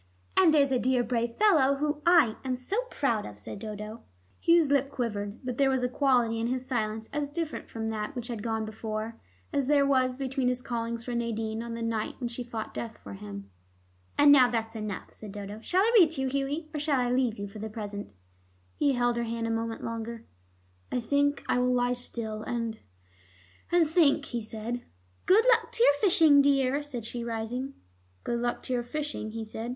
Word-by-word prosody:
"And 370 -4 +6
there's 285 -3 +4
a 255 - +2
dear 255 0 +2
brave 235 -1 -1
fellow 305 -11 +4
whom 295 +1 -1
I 315 -11 +6
am 260 -1 -1
so 395 - -2
proud 235 -7 0
of," 105 - -9
said 105 +1 -8
Dodo. 215 +1 -7 0.4
Hugh's 335 -4 +4
lip 275 -1 +3
quivered, 210 -5 -3
but 250 0 -4
there 275 -1 +5
was 260 -1 +1
a - - +3
quality 245 -4 +2
in 230 - 0
his 255 +1 -2
silence 220 -3 -2
as 290 -1 -1
different 325 0 -4
from 225 -1 -4
that 220 +5 -4
which 240 -1 -4
had 235 -4 -4
gone 220 0 -1
before, 220 +1 -5 0.3
as 275 -2 +1
there 285 -1 +4
was 255 -2 +2
between 265 -1 -1
his 250 0 0
callings 235 -1 -3
for 245 - -4
Nadine 225 -1 -2
on 235 0 -5
the 230 - -4
night 225 -2 -2
when 245 -2 -2
she 240 +1 -5
fought 230 -2 -6
death 230 -1 -5
for 100 - -10
him. 100 0 -8 0.7
"And 290 0 +7
now 260 -3 +7
that's 225 -1 -2
enough," 215 -3 -5
said 210 -2 -10
Dodo. 205 +1 -7
"Shall 370 +10 +2
I 460 +2 +2
read 340 -5 +7
to 270 - -3
you, 265 - 0
Hughie, 280 +4 -2
or 300 - -2
shall 290 -2 +1
I 245 -1 +1
leave 250 -3 +1
you 200 0 -4
for 200 +2 -10
the 220 +1 -4
present?" 205 - -6 0.6
He 285 -2 +3
held 245 -1 +1
her 235 - 0
hand 230 0 -3
a 230 - -1
moment 225 0 -3
longer. 230 0 -5 0.7
"I - - 0
think 285 +4 +1
I - - +2
will 250 0 +2
lie 245 0 +2
still 230 -3 -3
and 230 -1 -3 0.9
and 345 -2 +4
think," 305 -3 +3
he 240 -3 -3
said. 225 +2 -5 0.5
"Good 430 +5 +6
luck 460 -2 +4
to 460 - +2
your 285 - +7
fishing, 305 -3 +5
dear," 275 0 +2
said 260 -6 -6
she, 235 +1 -5
rising. 235 +4 -4 0.5
"Good 235 - -1
luck 240 0 -2
to 255 - -3
your 245 - +1
fishing?" 265 -3 -4
he 225 -1 -4
said. 220 +2 -6
245 Hz, 210 wpm, -28 LUFS, 225-280 Hz, 0.9 s, And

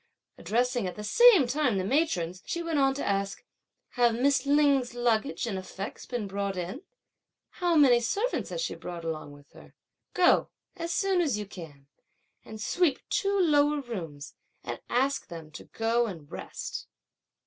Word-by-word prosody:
Addressing 245 -1 0
at 180 - -5
the 210 - -7
same 425 - +6
time 255 -4 +1
the 185 - 0
matrons, 185 - 0
she 340 - -3
went 325 -3 0
on 270 -1 +3
to 285 - -3
ask, 195 0 -1 0.5
"Have 240 -2 +2
Miss 270 +2 +2
Lin's 280 -4 +3
luggage 240 +2 0
and 200 -5 -3
effects 190 +1 -7
been 240 -4 -3
brought 200 -1 -3
in? 180 - -4 0.8
How 350 -2 +2
many 265 -6 +6
servants 410 - -1
has - - -3
she - - -2
brought 170 -2 -7
along 155 -3 -4
with 145 0 -17
her? - - -16 0.4
Go, 360 -1 +4 0.3
as 335 0 -4
soon 385 0 +2
as 285 -10 +1
you 210 - -4
can, 160 -8 -11 0.6
and 220 -1 -10
sweep 320 +6 0
two 400 0 +1
lower 295 -4 +3
rooms 165 - -7 0.3
and - - -5
ask 270 +3 0
them 165 -3 -9
to 155 - -10
go 230 +1 0
and 160 -8 -9
rest." - - -6
240 Hz, 165 wpm, -28 LUFS, 195-290 Hz, 0.8 s, same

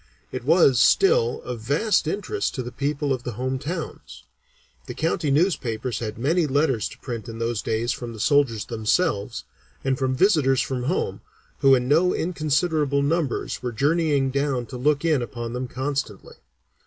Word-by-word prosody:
It - - -5
was, 145 -5 +5
still, 460 - +3
of 125 -2 -5
vast 155 - +1
interest 210 - -2
to 130 - -3
the 120 - -7
people 140 +2 -1
of 130 - -3
the 125 -1 -5
home 130 +3 -2
towns. 160 +4 -6 0.6
The - - -6
county 160 -1 0
newspapers 130 - 0
had 110 -2 -5
many 155 +7 +1
letters 135 -5 +1
to - - -13
print 120 -2 -6
in 115 - -7
those 115 -1 -1
days 115 +2 -1
from 120 -2 -5
the 110 - -10
soldiers 125 -5 +2
themselves, 115 - -1 0.4
and 135 0 0
from 130 -1 0
visitors 145 - +3
from 125 -2 -3
home, 175 +7 -1 0.4
who 135 -2 +6
in 125 -1 -1
no 165 +6 +3
inconsiderable 155 -3 0
numbers 150 -2 -1
were 125 -1 -3
journeying 140 +1 +1
down 140 -3 -1
to 125 - -8
look 145 +4 +1
in 155 -5 +2
upon 120 -1 -5
them 125 +1 -3
constantly. 130 -5 -4
135 Hz, 165 wpm, -24 LUFS, 120-155 Hz, 0.6 s, who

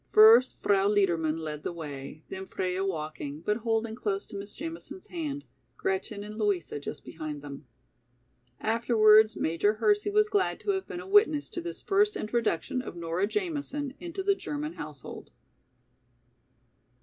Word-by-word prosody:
First 225 +4 +8
Frau 200 -1 +4
Liedermann 170 -6 +2
led 155 -2 -5
the - - -3
way, 150 -2 -7
then 190 0 -6
Freia 185 0 -2
walking, 155 -5 -4
but 210 +5 0
holding 225 -1 -1
close 205 -4 -2
to - - -10
Miss 200 +1 -6
Jamison's 330 +4 -7
hand, 295 -5 -4 0.3
Gretchen 380 - -2
and 210 +1 -8
Louisa 200 -8 0
just 145 - -7
behind 150 -2 -6
them. 140 -1 -9 0.9
Afterwards 220 -1 +5
Major 165 +6 +2
Hersey 415 - +2
was 425 +1 +4
glad 410 -2 +1
to 410 - +1
have 385 -1 -2
been 355 -3 -5
a 370 - -10
witness 390 -8 +4
to 345 - -5
this 345 0 -7
first 415 +1 +3
introduction 225 0 -1
of 250 - -8
Nora 170 +3 -1
Jamison, 290 - -3
into 350 +2 -5
the 400 +1 +4
German 300 -4 -4
household. 150 - -9
215 Hz, 150 wpm, -29 LUFS, -, 0.9 s, First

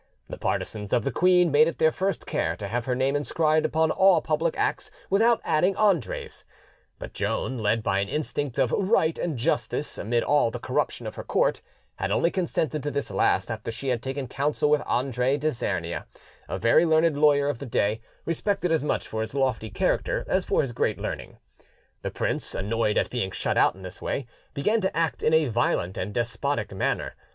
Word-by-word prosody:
The - - -6
partisans 105 -2 -3
of 120 - +3
the - - -1
queen 180 -2 +4
made 150 +2 +6
it 165 - -3
their 160 0 +4
first 195 +3 -2
care 80 +1 -1
to 100 +3 -6
have 120 +3 -2
her 125 -1 0
name 135 +2 +1
inscribed 155 +2 +1
upon 160 0 +1
all 190 -3 +5
public - - -1
acts - - -1 0.2
without 225 +4 +4
adding 180 +5 +2
Andre's; 195 - 0 0.5
but - - -8
Joan, 110 +5 -2
led 110 +1 +1
by 95 -2 +1
an 100 0 -2
instinct 145 -3 -3
of 130 -4 +2
right 185 -5 +2
and 165 -6 -2
justice 150 +2 -1
amid 115 +2 0
all 145 -4 +3
the - - -5
corruption - - -2
of - - -5
her - - -5
court, - - +1 0.4
had - - -2
only 170 - +2
consented 160 -4 -1
to 145 - -2
this 140 -1 -3
last - - +1
after 110 +1 -4
she 130 +4 -4
had 120 -3 0
taken 135 +1 -4
counsel 145 +4 0
with 150 - +4
Andre 130 +1 +1
d'Isernia, 150 -4 -2 0.4
a - - -2
very 115 +8 +4
learned 160 -1 +3
lawyer 145 -1 +4
of 145 -5 -2
the 140 - -6
day, 110 -1 0 0.2
respected 180 +2 -1
as 160 -3 +2
much 150 - -1
for 110 - -3
his 110 +5 -5
lofty 130 -5 0
character 105 - 0
as - - +1
for - - +2
his 130 - -3
great - - 0
learning. - - -6 0.6
The - - -3
prince, - - -3
annoyed 105 +1 0
at - - +1
being 120 -6 -1
shut 95 - -2
out - - +4
in 95 - -13
this 90 -1 -9
way, 135 - -2 0.3
began 215 +11 +1
to 190 -4 -1
act 165 -1 0
in 155 - +3
a 160 -1 +4
violent 110 -6 0
and 95 +3 -3
despotic 120 +2 -2
manner. 95 - -1
140 Hz, 200 wpm, -26 LUFS, 115-160 Hz, 0.6 s, made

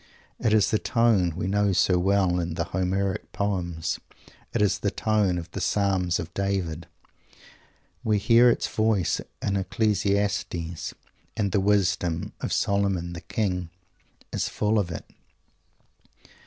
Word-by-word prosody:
It 110 - +1
is 110 -2 +4
the 110 - +2
tone 110 -8 +2
we 90 - -3
know 100 +1 +2
so 90 0 +3
well 95 -1 +2
in 85 -1 -3
the - - 0
Homeric 95 +1 -2
poems. 90 -5 -2 0.5
It - - -1
is 105 -1 +2
the 100 - 0
tone 105 -3 +1
of 85 - -6
the - - -5
Psalms 95 -4 +1
of 85 +1 -6
David. 95 -5 -2 1.2
We 110 -1 +2
hear 115 +4 +6
its - - +1
voice 110 -5 +1 0.2
in 100 0 +1
"Ecclesiastes," 100 -4 -1 0.4
and 100 -3 0
the 100 - +2
wisdom 95 -4 +1
of - - -3
"Solomon 95 -4 0
the 85 - -7
King" 90 -5 -2 0.6
is - - -1
full 105 +1 +1
of 95 -4 -1
it. 80 - -6
100 Hz, 140 wpm, -26 LUFS, 90-105 Hz, 1.2 s, hear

